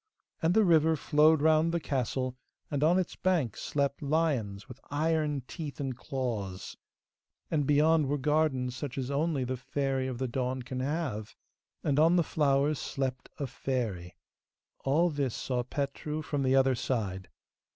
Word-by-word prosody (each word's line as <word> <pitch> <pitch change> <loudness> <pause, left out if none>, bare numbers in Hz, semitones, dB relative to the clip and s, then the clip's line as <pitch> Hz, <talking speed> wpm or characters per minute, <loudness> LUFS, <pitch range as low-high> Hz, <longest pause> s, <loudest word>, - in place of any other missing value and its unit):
And 165 +2 +2
the 220 - +6
river 160 -3 +4
flowed 150 0 +4
round 160 +1 +4
the 170 - 0
castle, 130 -3 -2 0.4
and 145 0 0
on 170 +4 +5
its 185 - -1
banks 165 - 0
slept 140 -1 -1
lions 140 -10 0
with 130 0 -11
iron 150 -2 0
teeth 150 -5 -6
and 135 -3 -2
claws; 120 -9 -4 0.8
and 150 -4 +1
beyond 150 +1 +4
were 145 +2 0
gardens 140 -3 +1
such 135 0 -5
as 130 0 -2
only 145 -1 0
the 130 +1 -2
Fairy 135 +1 -1
of 130 -2 -4
the 130 +1 -1
Dawn 125 +1 -2
can 130 +1 -5
have, 130 -6 -3 0.5
and 145 0 +2
on 165 +3 +5
the 175 - +4
flowers 145 -1 +1
slept 130 -2 -3
a 140 - -2
fairy! 115 -10 -3 0.6
All 165 +6 +2
this 140 -5 -1
saw 125 -2 -1
Petru 145 +4 -3
from 145 -1 -2
the 130 0 +3
other 135 0 +4
side. 100 -7 -2
140 Hz, 160 wpm, -30 LUFS, 130-155 Hz, 0.8 s, the